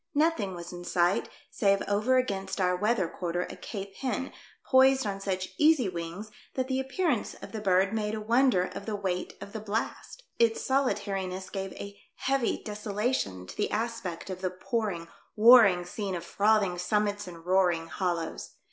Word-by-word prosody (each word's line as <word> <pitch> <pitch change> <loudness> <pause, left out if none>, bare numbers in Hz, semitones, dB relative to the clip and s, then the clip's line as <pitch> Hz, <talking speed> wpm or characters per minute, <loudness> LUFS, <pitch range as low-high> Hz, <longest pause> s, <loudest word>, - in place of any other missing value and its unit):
Nothing 290 - +1
was 170 0 -8
in 175 0 -7
sight 175 +1 +1 0.2
save 200 -2 +2
over 215 +6 +2
against 195 -6 -1
our 180 -1 +2
weatlier 205 -1 +1
quarter 175 0 -2
a - - -8
Cape 195 -2 -7
hen, 265 0 -2 0.3
poised 265 0 +5
on 195 -1 -3
such 185 -1 -2
easy 300 -7 +5
wings 175 +4 -5 0.2
that 260 -1 -1
the 260 0 0
appear 270 +7 0
ance - - -2
of - - -10
the 220 - -5
bird 190 0 +3
made 215 -1 -1
a - - -3
wonder 230 -2 +3
of 185 - -7
the 215 - -1
weight 185 -3 -2
of 200 - -9
the 220 - -4
blast; 215 - -4 0.2
its 230 -1 +3
solitariness 200 -8 -1
gave 195 -1 -4
a 200 0 -9
heavy 270 -2 0
desolation 210 - -2
to - - -10
the 210 - 0
aspect 215 -5 -3
of 185 0 -6
the 185 - 0
pouring, 185 -2 -3 0.3
war 235 +3 +9
ring 180 -5 +3
scene 195 +1 -4
of 170 0 -5
frothing 200 -2 +2
summits 205 +1 0
and 170 -2 -10
roaring 180 -3 +2
hollows. 170 -1 -3
200 Hz, 175 wpm, -29 LUFS, 185-230 Hz, 0.3 s, war